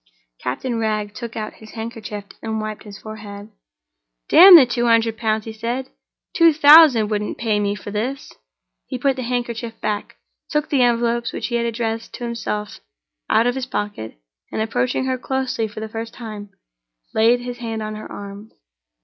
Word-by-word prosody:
Captain 230 - -3
Wragge 215 -2 -1
took 235 -1 -7
out 215 -1 -4
his 220 - -13
handkerchief 220 -3 -6 0.2
and 220 -1 -3
wiped 215 0 -6
his 205 -1 -10
forehead. 210 -1 -9 0.8
"Damn 365 +2 +10
the 300 -6 +9
two 240 0 -1
hundred 230 -1 +3
pounds!" 215 -1 -1
he 225 - -6
said. 240 +4 -4 0.4
"Two 335 -2 +5
thousand 290 -7 +7
wouldn't 210 0 -2
pay 220 -3 0
me 205 0 0
for 205 +1 -8
this!" 245 +7 -4 0.5
He - - -4
put 270 +2 +1
the 260 - -5
handkerchief 235 -2 -3
back, 210 -1 -3 0.3
took 300 -1 -1
the 275 -3 +2
envelopes 235 -1 +1
which - - -4
he 240 - -2
had 235 0 0
addressed 230 -1 -3
to - - -8
himself 230 -3 -4 0.5
out 230 - +4
of 245 - +2
his 260 -1 -4
pocket, 205 - -5 0.3
and, - - -3
approaching 245 +4 0
her 260 -1 -1
closely 260 -4 -2
for 215 +1 -9
the 220 - -4
first 225 +1 -6
time, 215 -3 -8 0.6
laid 230 +3 +3
his 245 0 -6
hand 225 -2 -4
on 215 0 -5
her 215 - -9
arm. 200 +2 -9
225 Hz, 175 wpm, -21 LUFS, 215-245 Hz, 0.8 s, Damn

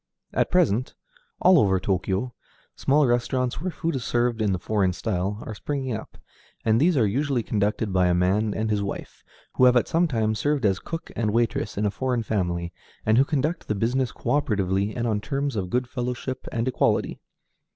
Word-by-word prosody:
At - - +1
present, 130 - +2 0.5
all 185 -3 +6
over 95 -6 +3
Tōkyō, 95 +5 -1 0.4
small 145 +2 +3
restaurants, 125 +2 0
where 185 - -1
food 165 -2 -3
is 130 - -3
served 120 -1 0
in 105 -2 +2
the 95 - +1
foreign 95 -1 0
style, 100 0 -2
are 110 - -5
springing 130 +2 -3
up, 110 - -9 0.5
and 110 +2 +3
these 170 0 +3
are 115 - +4
usually 130 +3 0
conducted 105 -1 -1
by 90 -1 +3
a 90 - +3
man 95 +5 +2
and 110 +1 -1
his 105 -1 +1
wife 100 - -6 0.3
who 130 - +6
have 125 0 +6
at 120 - +2
some 170 +2 +2
time 110 -6 0
served 145 +3 0
as 95 -2 +2
cook 165 0 -6
and 110 -2 0
waitress 115 -2 0
in 105 - 0
a 105 - +1
foreign 125 +1 -1
family, 90 -5 -2 0.3
and 110 +2 +4
who - - +7
conduct 155 +3 -1
the 105 - 0
business 125 +4 0
cöoperatively 105 -7 0
and 120 - -1
on 105 -3 0
terms 140 +1 -2
of 95 -4 -2
good 125 +3 0
fellowship 125 +1 -4
and 115 +1 -1
equality. 130 - +1
115 Hz, 195 wpm, -25 LUFS, 100-130 Hz, 0.5 s, who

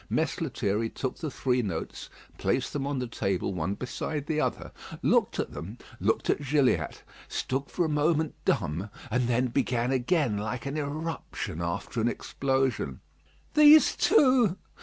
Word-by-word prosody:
Mess 160 +1 0
Lethierry 115 -7 -1
took 130 +2 -4
the 160 - -4
three 125 -1 0
notes, 90 -8 -5 0.3
placed - - 0
them 140 -1 -2
on 140 -1 -1
the 125 - -1
table 100 -5 -1
one 90 +3 -2
beside 140 +4 -4
the 155 0 0
other, - - -2 0.3
looked - - +3
at - - -2
them, 100 +8 -7 0.2
looked - - +1
at - - +1
Gilliatt, 140 -2 +1 0.2
stood 135 +2 -2
for 175 - 0
a - - +1
moment 155 +1 +1
dumb; 85 +8 0 0.2
and 125 +1 +1
then 125 +1 +1
began 125 -1 0
again, 130 - +1
like 110 +2 -4
an 140 +1 -3
eruption 150 - -4
after 85 +7 -2
an 115 - +2
explosion: 130 - -1 0.5
"These 300 +1 +7
too! 255 - +4
130 Hz, 155 wpm, -28 LUFS, 110-150 Hz, 0.5 s, These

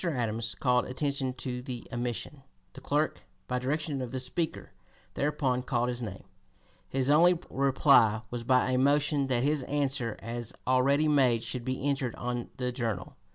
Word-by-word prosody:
Adams 115 -8 -1
called 125 -2 +3
attention 135 0 -1
to 125 0 -5
the 125 -2 -7
omission. 120 +4 -3 0.3
The 135 - -11
clerk, 145 +3 0 0.3
by 125 0 -1
direction 145 +2 -2
of 125 - -4
the 130 - -3
Speaker, 155 +6 -3 0.4
thereupon 135 -3 0
called 125 -1 0
his 120 0 -4
name. 95 -5 -6 0.7
His 135 +1 +1
only 175 +4 +6
reply 130 -5 +4
was 120 -1 -4
by 125 +1 +3
a 125 - +2
motion 145 +1 +2
that 125 -2 +1
his 145 0 +1
answer 135 -5 -1
as 120 0 -5
already 135 +4 +3
made 130 -6 +3
should 120 +1 -4
be 130 +2 -2
entered 135 -4 0
(p. - - -13
252) - - -11
on 120 -1 -3
the 125 -1 -1
Journal. 115 -7 -3
130 Hz, 170 wpm, -29 LUFS, 120-140 Hz, 0.7 s, only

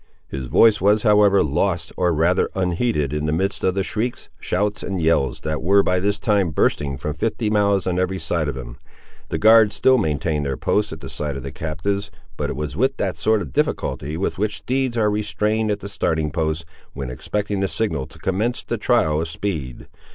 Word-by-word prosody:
His 65 -2 -5
voice 110 - +5
was, 105 +2 +3
however, 105 -2 +5
lost, 85 +5 -1
or 90 -1 +1
rather 85 +4 +2
unheeded, 90 - 0
in 75 0 -1
the - - +1
midst 95 +5 -1
of 95 - +2
the 95 - +1
shrieks, 110 +5 -3
shouts, 105 +3 -1
and 95 -2 -3
yells 80 -6 +1
that 80 0 -3
were, 100 +5 +4
by 90 0 +1
this 100 +2 0
time, 100 -3 +1
bursting 70 -2 0
from 75 +3 -3
fifty 110 +6 -1
mouths 100 -2 +2
on 90 -1 0
every 95 +1 0
side 85 -4 -1
of 70 -2 -3
him. - - -8 0.5
The - - -1
guards 110 -1 +6
still 130 -1 +4
maintained 75 -4 -1
their 70 -2 -2
posts 105 0 0
at - - -8
the - - -7
side 75 -2 -4
of 70 - -7
the 70 - -6
captives, 90 +8 -3 0.3
but - - -2
it - - -3
was 75 +1 -4
with 135 +4 +1
that 95 -4 -1
sort 105 +5 +1
of 70 - -10
difficulty 75 +3 -1
with 95 - -2
which 105 +1 0
steeds 130 -1 -1
are 105 -2 +2
restrained 105 +1 0
at 105 -1 -1
the - - -6
starting 80 -6 -1
post, 80 0 -1 0.3
when 65 -2 -5
expecting 100 +10 -3
the 95 - +1
signal 80 -12 -2
to - - -16
commence 105 +6 -1
the - - -3
trial 75 0 +2
of 80 - -2
speed. 80 -8 -4
95 Hz, 210 wpm, -21 LUFS, 75-105 Hz, 0.5 s, guards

